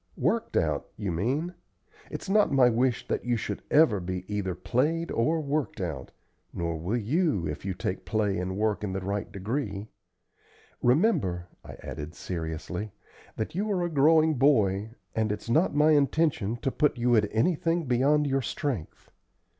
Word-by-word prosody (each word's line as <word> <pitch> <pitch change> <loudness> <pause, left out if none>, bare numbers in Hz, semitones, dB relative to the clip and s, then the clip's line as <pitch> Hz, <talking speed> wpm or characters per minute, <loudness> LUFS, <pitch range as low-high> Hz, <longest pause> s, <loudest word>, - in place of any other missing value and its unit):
"Worked - - 0
out, - - 0
you 100 -3 -2
mean. 135 - -1 0.6
It's - - -6
not 210 +2 +3
my 130 -3 +5
wish 120 +1 0
that - - -1
you 120 -1 0
should 105 -2 -4
ever 150 -10 +5
be 90 0 -4
either 100 -3 -2
played 145 - 0
or 155 +8 +1
worked 145 -4 -2
out, 80 -9 -4 0.4
nor 85 -1 -2
will 95 +9 -1
you 120 - +1
if 75 +3 -5
you 95 -2 -2
take 90 +1 -3
play 100 +1 0
and 95 +1 -3
work 105 0 0
in 95 -2 -2
the 95 - -1
right 100 +2 -3
degree. 100 0 -3 1.0
Remember," 120 - +2
I - - -10
added, 75 +2 -7
seriously, 90 +4 -5 0.4
"that 110 - -3
you 205 +5 -1
are 180 -3 0
a 175 - -1
growing 155 +2 +5
boy, 110 -6 +2 0.2
and 110 -1 0
it's 105 +2 -4
not 160 +4 +3
my 150 +1 +5
intention 140 -6 +2
to 135 - +1
put 150 -2 +1
you 120 0 +3
at 105 -2 +3
anything 165 +6 +1
beyond 140 +4 +3
your 135 -1 +1
strength. 125 - -4
115 Hz, 165 wpm, -27 LUFS, 95-150 Hz, 1.0 s, my